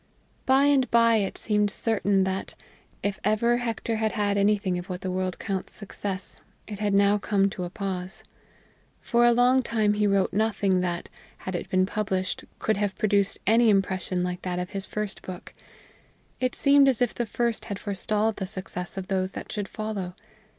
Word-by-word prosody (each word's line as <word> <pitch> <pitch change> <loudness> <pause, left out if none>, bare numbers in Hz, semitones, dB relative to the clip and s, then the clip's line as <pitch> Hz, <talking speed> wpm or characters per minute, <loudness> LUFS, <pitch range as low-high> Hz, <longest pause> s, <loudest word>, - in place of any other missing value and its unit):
By 265 +1 +5
and 275 -4 +3
by 230 -1 +5
it 200 -2 -1
seemed 210 -1 +1
certain 200 -2 +1
that, 190 0 -3 0.5
if 200 -1 -1
ever 225 +3 +2
Hector 230 -1 -2
had 220 -1 0
had 205 -2 +1
anything 200 -2 +2
of 175 - -9
what 180 -1 -4
the 185 - -3
world 185 0 -2
counts 195 -3 -4
success, 200 -2 -6 0.2
it 205 -2 -7
had 205 -2 +1
now 200 +1 +4
come 195 0 +1
to 180 - -4
a - - -5
pause. 190 -2 -5 0.8
For 240 0 +2
a - - +6
long 250 +2 +4
time 220 -4 +1
he 210 0 +2
wrote 195 -2 +2
nothing 200 -3 +2
that, 175 -1 -2 0.4
had 185 - -3
it 175 - -4
been 185 0 +3
published, 190 -2 -2
could 220 -2 0
have 205 -2 -1
produced 200 -1 +2
any 225 +3 +5
impression 190 -2 +1
like 180 0 -3
that 180 -1 -3
of 180 0 -4
his 195 0 -4
first 210 -2 -4
book; 180 -1 -9 0.9
it 255 -1 0
seemed 280 -1 +5
as 255 - +1
if 245 - +1
the 240 - -2
first 235 +1 -1
had 200 - -4
forestalled 210 +2 -1
the 190 - -3
success 185 -1 -4
of 190 - -3
those 190 -1 -1
that - - -7
should 205 -3 -3
follow. 200 -5 -4
200 Hz, 185 wpm, -26 LUFS, 190-220 Hz, 0.9 s, a